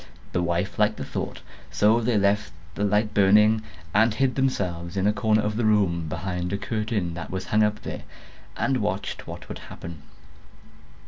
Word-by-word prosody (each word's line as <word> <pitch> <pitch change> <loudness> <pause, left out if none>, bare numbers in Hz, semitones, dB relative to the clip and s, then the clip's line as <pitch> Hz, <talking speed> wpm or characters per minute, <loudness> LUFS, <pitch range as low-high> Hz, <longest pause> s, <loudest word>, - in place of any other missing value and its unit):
The 90 - 0
wife 90 +4 -1
liked 105 0 +3
the - - -4
thought; - - -5 0.3
so 105 +8 +3
they 115 -1 +1
left 100 -1 +2 0.2
a 105 - -1
light 105 +1 +2
burning, 105 +2 +5 0.3
and 110 +3 +5
hid 130 +4 +1
themselves 90 -9 -1
in 95 - +1
a 105 - +4
corner 105 +1 +2
of 105 +1 -1
the 120 - 0
room, 95 -7 +2
behind 90 +1 -3
a 100 - 0
curtain 105 -5 -2
that 85 - -6
was 95 0 -4
hung 105 - +2
up 105 0 +1
there, - - -5 0.6
and 135 -1 +1
watched 105 -3 -3
what - - -8
would - - -7
happen. 85 -3 -9
105 Hz, 180 wpm, -25 LUFS, 90-110 Hz, 0.6 s, burning